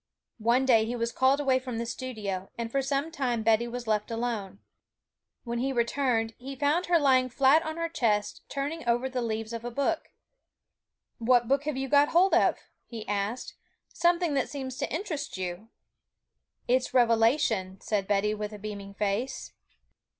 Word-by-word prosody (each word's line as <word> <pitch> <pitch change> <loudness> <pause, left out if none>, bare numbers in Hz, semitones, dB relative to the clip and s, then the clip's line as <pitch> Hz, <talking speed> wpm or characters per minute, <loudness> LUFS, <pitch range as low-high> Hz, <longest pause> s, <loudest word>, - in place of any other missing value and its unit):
One 235 +4 +3
day 225 -4 +5
he 240 +2 -3
was 230 0 -1
called 265 +3 +3
away 265 -3 +2
from 255 -3 -5
the 235 - -2
studio, 215 -7 -5
and 230 -1 -4
for 275 - +1
some 275 +4 -1
time 250 -8 -1
Betty 225 +1 +3
was 245 0 -5
left 215 -1 0
alone. 225 -4 -3 0.9
When 235 -1 -3
he 270 +2 0
returned, 235 -2 0
he 270 +2 -7
found 295 +6 +1
her 350 -1 +5
lying 260 -4 +3
flat 275 +5 +4
on 315 0 -5
her 335 0 -1
chest, 225 -11 0
turning 290 +4 -3
over 240 +2 +2
the 255 -1 -3
leaves 225 -1 -3
of 230 0 -5
a 240 - -3
book. 280 +7 -1 1.1
'What 240 0 +3
book 275 +3 +1
have 300 -3 -2
you 270 0 -2
got 285 +2 +4
hold 360 +2 +4
of?' 350 - +4 0.3
he 225 -3 -8
asked; 205 +4 -2 0.4
'something 345 -2 +2
that 275 -2 0
seems 265 -3 -5
to - - -3
interest 310 - -4
you.' 185 +4 -5 1.0
'It's 255 +1 +1
Revelation,' 225 -5 +3
said 205 -3 -1
Betty, 205 +1 +2
with 210 0 -5
a - - -7
beaming 200 -1 -7
face. 210 +6 -2
245 Hz, 170 wpm, -28 LUFS, 220-275 Hz, 1.1 s, day